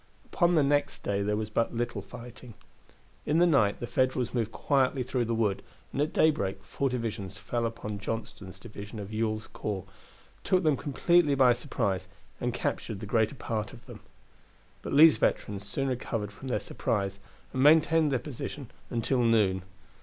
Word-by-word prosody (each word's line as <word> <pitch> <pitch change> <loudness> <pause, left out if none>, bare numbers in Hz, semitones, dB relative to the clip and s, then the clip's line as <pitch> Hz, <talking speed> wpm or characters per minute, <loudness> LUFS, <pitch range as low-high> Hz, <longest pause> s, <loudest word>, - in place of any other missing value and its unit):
Upon 175 -1 +3
the 155 - +5
next 145 +1 +1
day 100 0 0
there 105 +1 0
was 110 0 -3
but 115 +2 0
little 120 +1 -2
fighting. 125 -1 -11 0.7
In 150 - +2
the 175 - +6
night 135 -12 +3
the - - -3
Federals 125 0 0
moved 115 -3 -1
quietly 135 -1 +1
through 125 -1 -1
the 115 0 -1
wood, 105 -4 +1 0.3
and 140 - 0
at 150 - +1
daybreak 100 -11 +1
four 135 +5 -1
divisions 115 -6 -4
fell 120 -1 -1
upon 105 -2 -6
Johnston's 105 -3 -5
division 105 +3 -9
of 105 +1 -7
Ewell's 110 0 -1
corps, 100 -4 -5 0.6
took 185 -1 +2
them 155 -3 +4
completely 150 +2 +2
by 130 -2 +6
surprise, 110 -7 -2 0.3
and 125 - -1
captured 115 -3 -3
the 105 - -6
greater 110 +5 +1
part 110 -4 -3
of - - -14
them. - - -10 0.8
But - - -5
Lee's 155 -1 +8
veterans 100 -1 -1
soon 135 +6 -1
recovered 115 -4 -3
from 130 +6 -10
their 120 -4 0
surprise 100 0 -2 0.3
and 130 - 0
maintained 160 +1 +5
their 130 - +2
position 135 -1 -7 0.2
until 120 +2 0
noon. 105 -5 +3
115 Hz, 170 wpm, -29 LUFS, 105-135 Hz, 0.8 s, Lee's